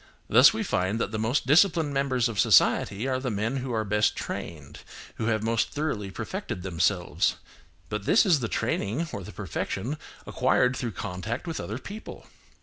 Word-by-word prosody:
Thus - - +7
we - - -2
find 95 +5 0
that 115 - -1
the 110 - -3
most 115 +6 0
disciplined 160 +1 +4
members 130 -3 +1
of 110 -3 -4
society 105 +1 +4
are 130 -1 0
the 130 -1 -3
men 110 +5 -1
who 130 -1 -4
are 110 -2 0
best 105 +1 +2
trained, 75 -2 -6 0.4
who 110 - -2
have 110 -2 0
most 115 0 +1
thoroughly 145 -10 -3
perfected 95 -1 -5
themselves, 90 0 +1 0.5
but 105 -2 -4
this 225 - +5
is 170 -7 +4
the 120 - -2
training 115 +7 -1
or 100 - -4
the - - -9
perfection 125 +11 -4 0.3
acquired 125 +1 +2
through 120 -4 -3
contact 100 - -5
with 165 -2 -4
other 110 - -4
people. 205 +11 -9
115 Hz, 175 wpm, -27 LUFS, 100-135 Hz, 0.5 s, Thus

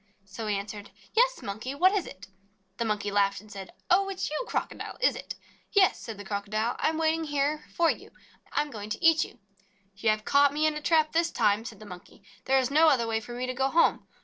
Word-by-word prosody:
So 195 +3 -7
he 210 - +1
answered:: 205 +1 -7 0.2
'Yes, - - +2
Monkey! 220 +7 -5
What 370 +6 +5
is 395 -4 -1
it?" 185 0 -11 0.5
The 235 - -1
Monkey 210 -2 -1
laughed, 200 -1 +2
and 215 0 -16
said: 195 -2 -8 0.2
"Oh, 390 +2 +4
it 385 -1 -6
's - - -2
you, 305 - -2
Crocodile, - - -4
is - - +3
it?" - - -7 0.4
"Yes," 395 -2 +4
said 225 -3 -7
the 205 - -9
Crocodile. 210 +3 -2
"I - - +2
am 320 - -3
waiting 320 0 +1
here 290 +1 -1
for 335 -1 +4
you. - - -9 0.4
I - - +1
am 295 - -10
going 210 -2 -7
to 220 +11 -3
eat 325 -1 +6
you." - - -11 0.6
"You 215 +3 0
have 215 0 0
caught 280 0 +4
me 305 +1 +1
in 310 - +2
a 300 - -5
trap 310 0 +3
this 335 +1 +2
time," 210 -2 +1
said 220 -3 -8
the 215 - -11
Monkey. 180 0 -12 0.2
"There 270 - +3
is 260 0 +1
no 315 +3 +5
other 250 -5 +2
way 225 -1 0
for 230 +2 -9
me 250 +1 -3
to 255 - -3
go 265 +1 +1
home. 335 +4 +2
255 Hz, 245 wpm, -28 LUFS, 210-315 Hz, 0.6 s, eat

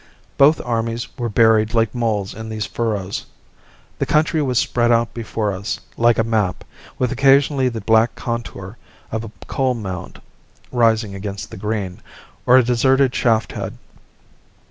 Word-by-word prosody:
Both 145 +3 +5
armies 115 0 -2
were 120 -3 -3
buried 110 0 +3
like 115 -1 +2
moles 110 -5 -1
in 110 0 -8
these 110 -1 -3
furrows. 105 -5 -3 0.8
The - - -1
country 155 +1 +2
was 130 -4 0
spread 120 0 +2
out 115 0 +2
before 110 -3 -2
us, 100 +4 -4 0.2
like 120 0 +3
a 115 - +3
map, 110 -5 -1 0.3
with 125 0 0
occasionally 135 +1 +3
the 115 -2 -5
black 110 +3 +3
contour 115 -4 -5 0.3
of 110 0 -2
a 110 - -8
coal 130 -2 0
mound 95 -6 -6 0.5
rising 115 -4 +2
against 100 0 -6
the - - -8
green, 100 -2 -3 0.5
or 125 - +7
a 130 - +6
deserted 130 +2 +3
shaft 115 -2 +1
head. - - -6
115 Hz, 150 wpm, -20 LUFS, 110-125 Hz, 0.8 s, or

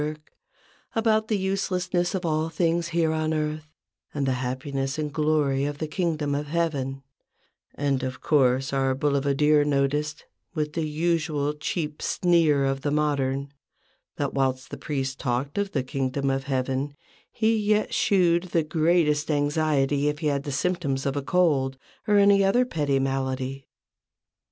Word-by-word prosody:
work, 155 +1 -5 0.6
about 220 -1 +2
the 215 - +1
uselessness 185 -2 -1
of 185 -1 -3
all 155 0 0
things 170 +1 0
here 165 -1 +1
on 155 0 0
earth, 155 0 -2 0.5
and 140 -1 0
the 135 - +1
happiness 135 +2 -3
and 150 -2 -3
glory 150 -3 +1
of 145 0 -2
the 155 - -3
Kingdom 155 -4 -1
of 145 +1 -2
Heaven: 145 -5 -2 0.7
and, 140 -2 0
of 130 0 -4
course, 135 -2 +2
our 135 -1 +1
boulevardiev 145 +1 +2
noticed, 145 +2 0 0.3
with 150 -1 -2
the 160 -1 -1
usual 155 -2 0
cheap 150 0 -4
sneer 165 -6 +2
of 135 0 -1
the 145 - -1
modern, 140 -2 0 0.6
that - - -2
whilst 130 -1 -1
the - - -5
priest 135 -3 -3
talked 135 +7 -2
of 200 -1 -1
the 135 - -1
Kingdom 135 +1 -1
of 135 0 -2
Heaven, 135 +1 -2 0.4
he 225 0 +2
yet 210 0 +1
shewed 175 -3 +3
the 170 -2 0
greatest 155 -1 +2
anxiety 145 -1 +1
if 150 0 0
he 155 0 -2
had 140 +1 -3
symptoms 140 -2 -1
of 135 0 -1
a 145 - -1
cold, 140 -5 +1 0.3
or 210 -1 +4
any 200 0 +5
other 240 +6 +3
petty 145 - 0
malady. 135 0 -2
150 Hz, 150 wpm, -25 LUFS, 135-165 Hz, 0.7 s, any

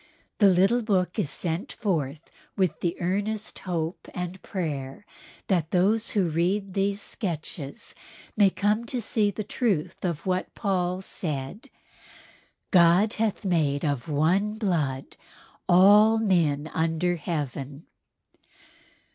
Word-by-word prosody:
The 205 - +7
little 195 +7 +3
book 190 -5 0
is 145 - 0
sent 175 - -3
forth 160 - -2 0.3
with 185 -6 +1
the 170 0 -2
earnest 205 +4 -2
hope 165 0 -3
and 180 +1 -5
prayer 150 -3 -4 0.4
that 170 -5 0
those 210 +6 +2
who 190 -3 +3
read 185 +5 0
these 200 +1 0
sketches 170 - -5 0.4
may 205 -2 +5
come 210 +4 0
to 245 +2 -3
see 220 -2 +1
the 210 +2 -4
truth 190 - -1
of 170 -5 -2
what 185 0 -2
Paul 185 -2 -1
said: 150 - -4 1.0
"God 180 +4 +5
hath 220 -1 -1
made 155 -5 +1
of 145 -2 -2
ONE 185 +9 +1
BLOOD 155 - -2 0.5
all 205 +5 +7
men 165 -9 +1
under 165 +2 0
heaven." 145 -3 -4
180 Hz, 120 wpm, -26 LUFS, 160-205 Hz, 1.0 s, The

